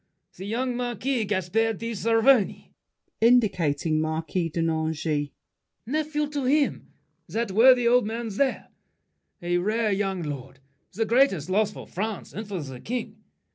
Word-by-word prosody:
The 190 - -8
young 245 +3 -1
marquis, 245 0 -1
Gaspard 205 +3 0
de 230 0 -4
Saverny, 225 +1 +2 0.5
[Indicating 175 -10 +3
Marquis 160 +2 -2
de 165 +2 -2
Nangis. 160 -2 -1 0.6
Nephew 300 +3 -1
to 290 -3 -3
him, 285 +2 +1 0.4
That 230 -2 -2
worthy 245 +3 +6
old 245 -2 +4
man 230 +1 -4
there. 260 +6 -1 0.7
A 175 0 +1
rare 215 +3 0
young 195 -2 -1
lord; 135 -3 -6 0.4
The 225 +3 0
greatest 220 - +2
loss 210 +2 +2
for - - -10
France 215 +3 -5
and 215 0 -6
for 190 -6 -4
the 130 -3 -8
King. 245 - -5
215 Hz, 135 wpm, -25 LUFS, 175-240 Hz, 0.7 s, worthy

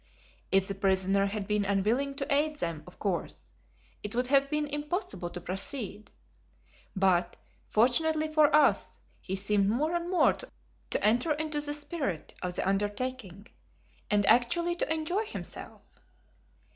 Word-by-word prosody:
If 195 0 +3
the 195 - -3
prisoner 195 0 +2
had 200 -1 -4
been 210 -1 +1
unwilling 215 +8 0
to 275 0 -1
aid 300 +2 +2
them, 170 - -3
of 180 - -14
course, 190 -5 -3 0.5
it 210 +2 -5
would 250 +1 +1
have 275 +1 +3
been 300 0 0
impossible 295 - -3
to 180 - -6
proceed, 200 +4 -4 0.9
but, 180 -2 +2 0.3
fortunately 310 +8 +2
for 310 -1 +5
us, 300 -2 +3 0.2
he 190 - -3
seemed 200 0 +1
more 295 +9 0
and 345 0 -2
more 365 - +4
to - - -7
enter 240 +8 +3
into 300 0 -2
the 290 0 -2
spirit 290 - -4
of 180 -1 -3
the - - -1
undertaking, 205 0 -2 0.6
and 205 -1 +3
actually 340 - +3
to - - -1
enjoy 320 +5 0
it 445 - -5
himself. - - -7
240 Hz, 145 wpm, -29 LUFS, 195-300 Hz, 0.9 s, for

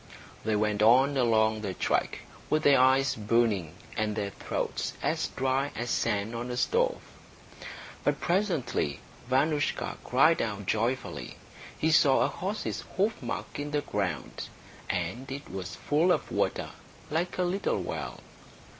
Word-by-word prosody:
They 110 0 +1
went 105 0 +1
on 130 +6 +6
along 110 -3 +3
the 95 -3 -3
track, - - 0 0.3
with 155 - +2
their 140 -2 +6
eyes 130 +1 +4
burning 105 -6 +1 0.2
and 110 -1 0
their 100 -2 -2
throats - - -3
as - - 0
dry 135 +2 0
as 120 +2 -3
sand 105 +2 0
on 120 +1 -4
a 125 - -3
stove. - - +2 1.0
But - - +1
presently 170 - 0 0.3
Vanoushka 145 +3 +1
cried 155 +6 +4
out 105 -3 -3
joyfully. 115 - -1 0.4
He 160 - +2
saw 140 -4 +5
a - - +4
horse's 200 +4 -3
hoofmark 205 -4 -2
in 145 0 -3
the 145 0 0
ground. 100 -8 -3 0.4
And 110 +10 -2
it 140 +2 -7
was 95 -2 -5
full 160 +5 +2
of - - 0
water, - - -1 0.4
like 170 +3 -1
a 185 - +2
little 185 +3 0
well. - - -5
130 Hz, 140 wpm, -29 LUFS, 110-150 Hz, 1.0 s, on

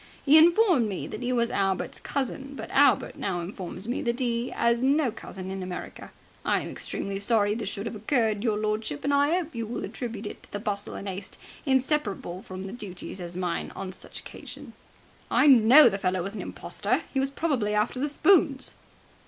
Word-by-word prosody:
He 285 +1 +6
informed 335 - +6
me 190 - -4
that 215 - -7
'e 250 0 -1
was 235 -1 +1
Albert's 195 -1 -1
cousin, 275 0 -3
but 220 - -7
Albert 280 -1 +3
now 185 -3 -2
informs 185 +2 -7
me 245 - -1
that 235 +1 -1
'e 240 -1 -1
'as 235 0 +1
no 275 -1 +3
cousin 190 -3 -8
in 190 0 -4
America. 185 -1 -7 0.3
I - - +1
am - - -6
extremely 195 0 -4
sorry 205 0 +2
this 215 -3 -3
should 200 +1 -5
have - - -4
occurred, 220 -1 0
your 220 -3 +1
lordship, 215 -7 -2
and 285 - +1
I 285 +4 +3
'ope 335 -3 -4
you 230 -2 -4
will 235 - -4
attribute 230 -4 -6
it - - -7
to - - -17
the - - -3
bustle 205 -1 -3
and 200 - -6
haste 190 +1 -5 0.3
inseparable 260 - 0
from 190 +1 -7
duties 190 -3 -7
as 175 0 -7
mine 180 -2 -2
on 190 -1 -5
such 190 - -7
a - - -21
occasion." - - -10 0.6
"I - - +4
know 265 +2 +8
the 195 - 0
fellow 185 -1 0
was 195 +3 -5
an - - -5
impostor. - - -2
He 270 - +1
was 270 0 +1
probably 270 -8 0
after 210 +4 0
the 290 +3 0
spoons!" 295 -3 +3
225 Hz, 200 wpm, -27 LUFS, 195-270 Hz, 0.6 s, know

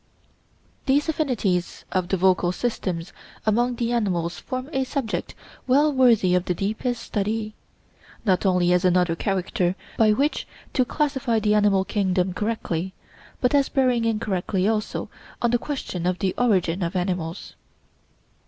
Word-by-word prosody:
These 285 +4 +3
affinities 235 - -1
of 185 -2 0
the 190 - 0
vocal 180 -1 +3
systems 185 -5 -3 0.3
among 240 +3 +2
the 235 0 -1
animals 180 -7 -1
form 255 0 -5
a 265 - +1
subject 260 -4 -3 0.3
well 290 +4 +4
worthy 235 -8 +4
of 180 0 +2
the 180 - -1
deepest 220 +5 -2
study, 215 +1 -2 0.7
not 185 -4 +2
only 180 -2 +3
as 180 - +2
another 180 -2 +3
character 185 -1 -1 0.2
by 220 -1 +6
which 280 +8 0 0.3
to 255 - +2
classify 270 -4 0
the 210 0 +2
animal 205 -2 +3
kingdom 185 -3 0
correctly, 190 -4 -2 0.5
but 250 +1 +2
as 280 -1 +3
bearing 250 -4 +2
indirectly 200 -3 0
also 215 -1 -1 0.3
on 240 - +1
the 240 - +2
question 190 - -4
of 180 0 0
the 190 -1 0
origin 190 -7 +1
of 170 +1 -2
animals. 180 -1 -3
210 Hz, 145 wpm, -24 LUFS, 180-245 Hz, 0.7 s, by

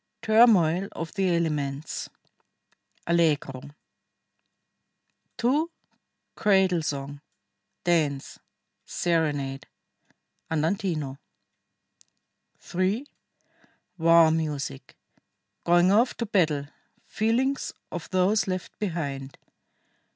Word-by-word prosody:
TURMOIL 200 -6 +4
OF 165 0 -6
THE 195 -3 +1
ELEMENTS 150 -3 -2 1.0
(Allegro) 155 -6 +1 1.8
2. 280 +7 +1 0.6
CRADLE 190 -4 +3
SONG. 140 -1 -4 0.6
DANCE. 155 -6 0 0.4
SERENADE 145 -5 -1 0.8
(Andantino) 160 -4 -1 1.4
3. 190 +9 -1 0.9
WAR 165 -1 +6
MUSIC. 150 - -3 0.7
GOING 175 +2 +4
OFF 230 +5 +3
TO 235 - -2
BATTLE. 160 -9 +1 0.4
FEELINGS 250 +5 0 0.2
OF 175 -2 -6
THOSE 190 +3 +2
LEFT 185 -1 -5
BEHIND. 140 -8 -4
170 Hz, 70 wpm, -26 LUFS, 150-195 Hz, 1.8 s, WAR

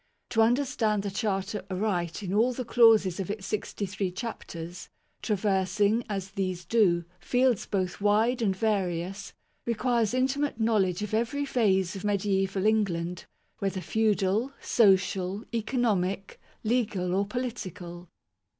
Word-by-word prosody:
To 225 - +3
understand 225 -4 +2
the 200 - -3
Charter 205 -1 -2
aright 185 -2 -2
in 190 -1 -3
all 235 +5 +3
the 250 0 -4
clauses 225 -6 +5
of 195 - -3
its 205 -1 -4
sixty 210 0 -3
three 195 0 -2
chapters, 175 -4 -7 0.3
traversing, 205 +2 +1
as 195 -2 -4
these 185 -3 -3
do, 180 -7 +3
fields 245 +4 +1
both 185 -2 -2
wide 220 +5 +2
and 195 -4 +1
various, 195 -2 -2 0.3
requires 235 -1 +1
inti 260 +2 +1
mate 285 -5 -1
knowledge 210 -4 +1
of 210 - -5
every 235 +6 0
phase 195 -8 +1
of 195 - -7
mediaeval 195 -1 0
England, 180 -5 0 0.3
whether 195 -1 -1
feudal, 215 +4 +1
social, 195 -1 +2
economic, 210 -5 -1 0.2
legal, 215 -6 0
or 200 +1 +1
political. 185 -8 -5
205 Hz, 130 wpm, -28 LUFS, 185-225 Hz, 0.3 s, clauses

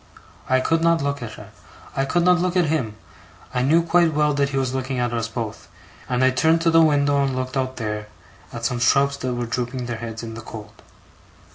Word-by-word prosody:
I 130 0 +3
could 165 +4 +1
not 170 -2 +3
look 140 -1 -2
at 110 -3 -6
her, - - -12 0.4
I 135 - +1
could 175 +5 +1
not 180 0 +4
look 180 0 0
at 175 - +4
him, 140 -9 -1 0.6
I 125 - 0
knew 160 +6 +4
quite 170 -2 +3
well 150 0 +2
that 140 0 +1
he 135 - -3
was 130 -1 0
looking 130 0 -2
at 120 -1 -1
us 115 -1 -1
both; 115 -2 -6 0.4
and 125 +1 +1
I 130 - +5
turned 160 +5 +2
to 165 0 +3
the 165 0 +6
window 145 -2 +3
and 135 -1 -1
looked 130 0 -3
out 130 -1 -1
there, 105 -2 -4 0.4
at - - -5
some 125 - -1
shrubs 140 +3 +3
that 125 -2 -3
were 120 0 -2
drooping 125 +1 -3
their 120 -1 -4
heads 115 0 -6
in 115 -1 -6
the 115 - -7
cold. 110 -2 -11
130 Hz, 230 wpm, -22 LUFS, 120-150 Hz, 0.6 s, the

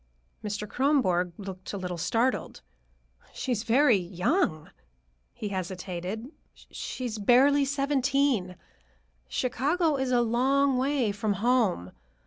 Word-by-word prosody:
Mr. 210 0 -4
Kronborg 205 -11 +1
looked 190 -1 -8
a - - -3
little 180 -2 -4
startled. 235 +9 -1 0.7
"She 260 - -3
is 220 -4 0
very 240 +1 +4
young," 180 - -1 0.6
he 210 - -6
hesitated; 185 - -5 0.2
"she 255 - -7
is 225 -3 -4
barely 275 +6 +5
seventeen. 275 -7 +1 0.7
Chicago 290 - 0
is 265 -1 -1
a 245 -1 +4
long 265 +4 +2
way 265 -4 +1
from 205 +1 -1
home. 205 - +1
235 Hz, 115 wpm, -27 LUFS, 190-270 Hz, 0.7 s, barely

